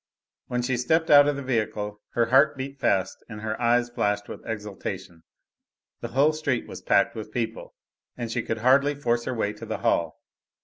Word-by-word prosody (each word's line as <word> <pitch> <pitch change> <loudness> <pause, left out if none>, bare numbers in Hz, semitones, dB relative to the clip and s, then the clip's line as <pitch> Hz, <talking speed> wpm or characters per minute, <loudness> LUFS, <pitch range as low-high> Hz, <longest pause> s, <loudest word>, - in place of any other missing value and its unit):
When 125 0 -1
she 125 0 0
stepped 160 +7 +1
out 145 0 +8
of 145 - +1
the 140 - -5
vehicle 105 -4 -2
her 120 - +3
heart 140 +2 +5
beat 135 +1 -6
fast 95 -1 0
and 105 -2 -8
her 110 +1 -4
eyes 120 +1 +3
flashed 105 -3 -1
with - - -9
exultation: 95 -5 -6 0.8
the - - -5
whole 140 +6 +3
street 155 0 -1
was - - -9
packed - - +3
with - - -7
people, - - -4 0.4
and 120 -2 -4
she 120 - 0
could 115 - -3
hardly 140 +3 +4
force 120 -4 0
her 130 - -2
way 105 -2 -1
to 105 +2 -9
the - - -3
hall! 85 -2 +1
120 Hz, 190 wpm, -25 LUFS, 105-140 Hz, 0.8 s, out